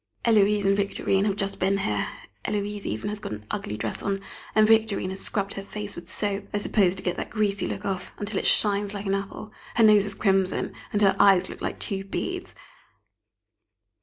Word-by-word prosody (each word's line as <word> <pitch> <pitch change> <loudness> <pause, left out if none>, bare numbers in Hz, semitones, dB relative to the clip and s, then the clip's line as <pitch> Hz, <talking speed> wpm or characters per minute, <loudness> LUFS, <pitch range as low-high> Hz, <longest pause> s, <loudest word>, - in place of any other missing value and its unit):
Héloise 210 -2 +4
and 195 0 +4
Victorine 195 -1 +1
have 200 -2 +1
just 195 -1 -3
been 195 +1 +2
here. 105 - 0 0.4
Héloise 205 -1 -2
even 110 - -3
has 210 0 -4
got 110 - -5
an 105 0 -8
ugly 105 - -3
dress 110 0 -3
on, 195 -1 -1 0.4
and 215 0 +6
Victorine 220 -4 +3
has 190 - -6
scrubbed 200 -1 -2
her 195 - -5
face 205 +1 -6
with 170 +1 -9
soap 200 -1 -1
I - - -1
suppose 200 -3 +2
to 190 - -8
get 180 -2 -1
that - - -4
greasy 205 -3 0
look 105 -2 -5
off 190 -2 -3
until 205 -1 -2
it - - 0
shines 205 -1 +4
like 200 +1 -5
an 195 - 0
apple, 195 +2 -4 0.2
her 230 - +5
nose 210 -2 +6
is 200 - -4
crimson, 195 -2 +1 0.2
and 210 0 +1
her 195 -1 +5
eyes 190 -2 +5
look - - -9
like - - -3
two 195 -1 -2
beads. 195 - -4
200 Hz, 205 wpm, -26 LUFS, 190-205 Hz, 0.4 s, and